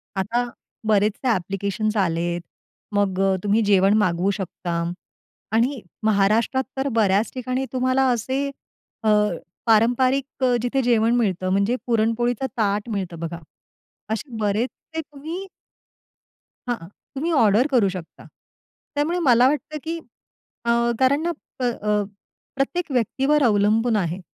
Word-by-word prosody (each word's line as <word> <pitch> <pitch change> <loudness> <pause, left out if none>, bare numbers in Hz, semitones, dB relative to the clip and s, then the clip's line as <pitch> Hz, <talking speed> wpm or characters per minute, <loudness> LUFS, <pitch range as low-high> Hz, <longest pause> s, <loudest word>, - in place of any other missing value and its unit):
आता 230 +6 0 0.4
बरेचसे 210 +4 +2
ॲप्लिकेशन्स 200 +2 -1
आलेत, 175 -2 0 0.5
मग 195 -2 +1
अ, 195 -1 +3
तुम्ही 210 +2 +3
जेवण 195 0 +4
मागवू 185 -1 +2
शकता 175 -2 -3 0.7
आणि 240 +2 +1 0.2
महाराष्ट्रात 220 +5 +2
तर 265 +1 0
बऱ्याच 205 0 +3
ठिकाणी 255 +1 -2
तुम्हाला 255 +1 +2
असे 260 +4 -1 0.6
अ, 220 - +3 0.6
पारंपारिक 255 +4 +2
अ, 250 -1 +4
जिथे 255 +2 0
जेवण 235 -1 +3
मिळतं 185 -6 0
म्हणजे 200 +5 +2
पुरणपोळीचा 235 +2 +1
ताट 210 0 0
मिळतं 185 -6 -4
बघा. 170 0 -5 0.7
असे 225 +3 -4
बरेचसे 225 +9 -2
तुम्ही 315 +5 -7 1.2
हां, 230 -9 -3 0.3
तुम्ही 320 +5 -1
ऑर्डर 230 -2 +4
करू 235 -7 +4
शकता. 180 -3 -9 0.7
त्यामुळे 315 +5 0
मला 250 -6 +5
वाटतं, 300 +2 -2
की 330 +1 -3 0.7
अ, 235 - +3 0.3
कारण 270 +3 +3
ना, 340 - -1 0.4
अ, 210 -2 0 0.5
प्रत्येक 310 +4 -1
व्यक्तीवर 270 +4 +2
अवलंबून 220 +1 +3
आहे, 175 -2 -1
225 Hz, 120 wpm, -23 LUFS, 200-260 Hz, 1.2 s, मला